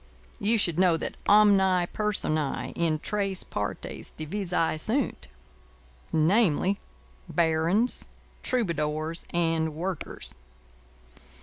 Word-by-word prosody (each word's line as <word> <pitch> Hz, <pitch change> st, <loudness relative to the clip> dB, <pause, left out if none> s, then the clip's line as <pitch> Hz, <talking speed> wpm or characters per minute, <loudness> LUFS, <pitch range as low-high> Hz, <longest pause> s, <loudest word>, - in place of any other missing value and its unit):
You 220 Hz, +3 st, +2 dB
should 175 Hz, -5 st, +2 dB
know 180 Hz, -3 st, +4 dB
that -, -, -5 dB
omnæ 195 Hz, -4 st, +5 dB
personæ 155 Hz, -9 st, -1 dB
in 165 Hz, -2 st, +1 dB
tres 195 Hz, +2 st, -1 dB
partes 105 Hz, 0 st, -5 dB
divisæ 170 Hz, -1 st, -1 dB
sunt. 225 Hz, -, -1 dB, 0.8 s
Namely: 185 Hz, +3 st, +2 dB, 0.5 s
Barons, 165 Hz, +8 st, +1 dB, 0.3 s
Troubadours, 160 Hz, -, -1 dB
and 165 Hz, -2 st, 0 dB
Workers. 165 Hz, -, -5 dB
175 Hz, 85 wpm, -27 LUFS, 155-200 Hz, 0.8 s, omnæ